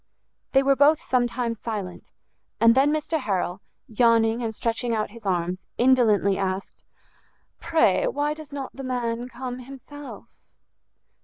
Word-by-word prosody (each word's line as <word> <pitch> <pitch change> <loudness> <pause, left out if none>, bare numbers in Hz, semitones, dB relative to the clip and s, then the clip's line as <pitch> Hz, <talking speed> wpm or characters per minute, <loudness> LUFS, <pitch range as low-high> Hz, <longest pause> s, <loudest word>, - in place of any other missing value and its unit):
They 270 0 +5
were 275 0 +4
both 290 +3 +5
some 250 -1 +1
time 235 -1 -2
silent, 210 -5 -6 0.5
and 230 0 +6
then 270 +4 +4
Mr 310 +1 -1
Harrel, 190 -6 -2 0.3
yawning 230 0 +3
and 225 -2 -3
stretching 230 +1 -1
out 215 -1 -2
his 225 -2 -10
arms, 180 0 -1 0.2
indolently 225 -6 +3
asked, 190 0 -4 0.8
"Pray, - - +2
why 295 -10 -1
does 310 -1 -11
not 275 -2 -6
the 270 - -7
man 245 -1 -2
come 255 0 -6
himself?" 275 +3 -10
240 Hz, 140 wpm, -24 LUFS, 220-270 Hz, 0.8 s, and